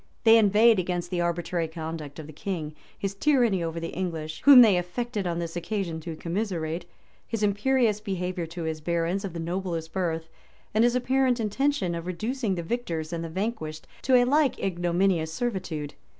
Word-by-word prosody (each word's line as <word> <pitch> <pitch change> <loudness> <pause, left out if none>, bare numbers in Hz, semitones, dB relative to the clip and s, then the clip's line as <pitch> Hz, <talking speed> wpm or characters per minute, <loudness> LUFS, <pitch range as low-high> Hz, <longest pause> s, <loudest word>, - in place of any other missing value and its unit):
They 225 0 +8
inveighed 215 +1 +5
against 180 0 -2
the 175 -1 0
arbitrary 170 0 -1
conduct 160 -3 -6
of 155 - -7
the 155 - -11
king; 155 -3 -4 0.2
his 195 -1 -3
tyranny 235 -5 +2
over 165 0 -3
the 165 0 -4
English, 165 -4 -4
whom 280 -3 +11
they 210 -5 +5
affected 200 +3 -2
on 170 -1 -1
this 170 -1 -4
occasion 175 -2 -3
to 165 0 -6
commiserate; 170 -2 -3 0.4
his 225 -2 -2
imperious 210 +1 +2
behavior 185 -4 -3
to 170 +1 -6
his 160 -1 -3
barons 170 +4 -1
of 195 -4 -5
the 170 - -5
noblest 170 -1 -3
birth; 165 -3 -1 0.5
and 220 +2 +4
his 240 +1 +3
apparent 255 0 +2
intention 225 -3 0
of 170 +1 -5
reducing 215 +4 -2
the 170 - -4
victors 165 -6 -3
and 165 0 -3
the 165 - -5
vanquished 160 -4 -4 0.2
to 260 - +3
a 245 -1 +6
like 285 +1 +3
ignominious 175 -2 0
servitude. 175 -8 -3
180 Hz, 180 wpm, -27 LUFS, 165-220 Hz, 0.5 s, whom